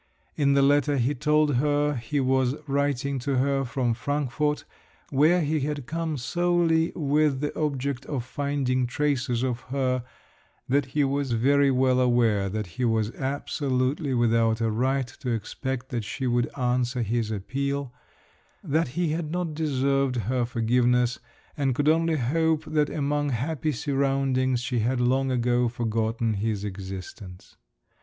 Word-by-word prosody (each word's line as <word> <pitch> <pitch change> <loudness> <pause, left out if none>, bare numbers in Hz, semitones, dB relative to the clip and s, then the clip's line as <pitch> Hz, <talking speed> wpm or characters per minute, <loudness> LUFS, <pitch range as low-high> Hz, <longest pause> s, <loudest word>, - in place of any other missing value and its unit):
In 140 -2 +2
the 140 0 +4
letter 145 +1 +3
he 130 +3 +1
told 150 0 +2
her 145 +2 +2
he 130 +3 -2
was 130 0 +2
writing 140 -1 0
to 135 +2 -1
her 135 +1 +1
from 125 -2 -1
Frankfort, 145 +3 -1 0.5
where 155 +6 +4
he 155 0 0
had 145 -1 -3
come 160 +1 -3
solely 170 +3 +1
with 150 -2 +1
the 145 +1 -3
object 140 -3 -2
of 135 -5 -3
finding 130 -2 -1
traces 130 -2 0
of 125 -2 -1
her, 130 -2 0 0.6
that 140 +1 +2
he 145 - +4
was 140 -2 0
very 140 +4 +3
well 130 -1 +3
aware 115 -6 +2
that 105 +2 -3
he 120 +8 -5
was 110 -2 +1
absolutely 135 +1 -1
without 115 -1 +2
a 115 -1 0
right 130 +4 +1
to 125 +1 -7
expect 125 +3 -3
that 120 -3 -2
she 130 +6 -4
would 120 -1 +1
answer 125 -1 0
his 115 0 -1
appeal; 135 +5 -3 0.7
that 160 +3 +1
he 175 -2 +1
had 155 0 -2
not 175 -2 -2
deserved 140 -3 0
her 120 +2 0
forgiveness, 125 +1 +1 0.4
and 135 -3 0
could 145 +3 0
only 165 +1 +3
hope 155 +4 +1
that 155 -1 +1
among 145 0 -1
happy 145 +5 -1
surroundings 135 -2 0
she 125 -1 -1
had 120 +3 0
long 130 +2 +2
ago 120 -1 +1
forgotten 115 -1 -1
his 105 0 -2
existence. 95 -1 -8
130 Hz, 150 wpm, -26 LUFS, 120-145 Hz, 0.7 s, the